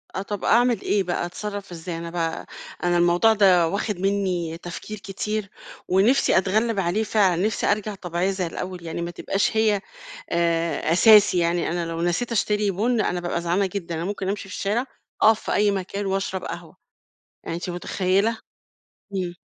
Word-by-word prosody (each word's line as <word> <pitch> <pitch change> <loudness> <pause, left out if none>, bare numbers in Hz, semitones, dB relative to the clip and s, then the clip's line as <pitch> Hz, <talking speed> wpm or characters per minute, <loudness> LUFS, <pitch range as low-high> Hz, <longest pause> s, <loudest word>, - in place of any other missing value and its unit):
آه، 190 - -1
طَب 200 0 -5
أعمل 240 +1 +3
إيه 200 -2 +1
بقى، 175 -1 -2
أتصرّف 200 +2 -6
إزاي 170 0 -6
أنا 170 0 -6
بقى؟ 165 -1 -3 0.4
أنا 175 0 +2
الموضوع 175 +6 +4
ده 185 -5 +5
واخِد 200 +1 -2
مني 185 -4 -1
تفكير 175 +5 -7
كتير، 200 +1 -4 0.4
ونِفسي 200 +8 +3
أتغلّب 215 +3 +1
عليه 190 +5 0
فعلًا، 190 -5 +2
نِفسي 220 - 0
أرجع 210 0 -2
طبيعية 180 +1 -1
زي 185 -2 -2
الأول 180 +1 -6
يعني 165 +1 -4
ما 170 - -3
تبقاش 195 +4 -1
هي 215 -3 +3 0.5
آآ، 170 -1 0
أساسي 210 0 +6
يعني 170 0 +1
أنا 175 0 -1
لو 165 0 -4
نسيت 175 +8 0
أشتري 210 -2 +1
بُن 220 +4 +1
أنا 180 - -1
بابقى 175 -1 -2
زعلانة 175 +4 +1
جدًا، 175 -4 -4
أنا 165 - -3
ممكن 195 -1 -3
أمشي 200 -1 -4
في - - -6
الشارع 215 +6 -1 0.4
أقف 220 0 +6
في - - -2
أي 205 0 +3
مكان 195 +1 -3
وأشرب 195 -1 -2
قهوة. - - -8 0.7
يعني 165 - -4
أنتِ 180 +1 -5
متخيلة؟ 185 +4 +1 0.8
امم. 180 -2 -2
190 Hz, 175 wpm, -24 LUFS, 175-205 Hz, 0.8 s, أساسي